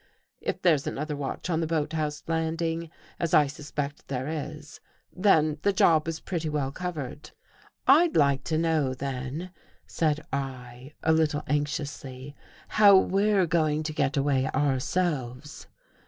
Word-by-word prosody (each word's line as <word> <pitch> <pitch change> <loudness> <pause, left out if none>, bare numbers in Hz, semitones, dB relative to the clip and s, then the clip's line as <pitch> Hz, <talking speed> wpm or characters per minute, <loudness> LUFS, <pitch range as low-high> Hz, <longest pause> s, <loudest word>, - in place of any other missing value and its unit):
If - - -4
there's 160 -6 +3
another 150 +1 -3
watch 140 +3 -4
on: 160 - +1
the 165 - -1
boathouse 155 -1 -2
landing, 165 0 -1 0.3
as 170 -1 +1
I 150 - +6
suspect 145 0 -5
there 130 0 -3
is, 150 -1 -6 0.4
then 155 -6 +3
the 200 - +3
job 165 -5 +3
is 165 -1 -3
pretty 165 -4 -3
well 145 -3 -1
covered." 150 -5 -6 0.3
" - - -27 0.3
I'd 320 +5 +5
like 140 -3 +3
to 160 - 0
know 155 -5 +1
then," 135 +6 -5 0.3
said 155 -2 -1
I, 130 0 -5
a 160 - +4
little 155 -2 +1
anxiously, 145 -2 -3
| - - -24
" - - -27
how 200 -2 +9
we're 195 0 +3
going 155 -2 +1
to 155 0 -4
get 145 -2 0
away 135 -1 +2
ourselves." 145 -1 -1
150 Hz, 150 wpm, -27 LUFS, 140-165 Hz, 0.4 s, how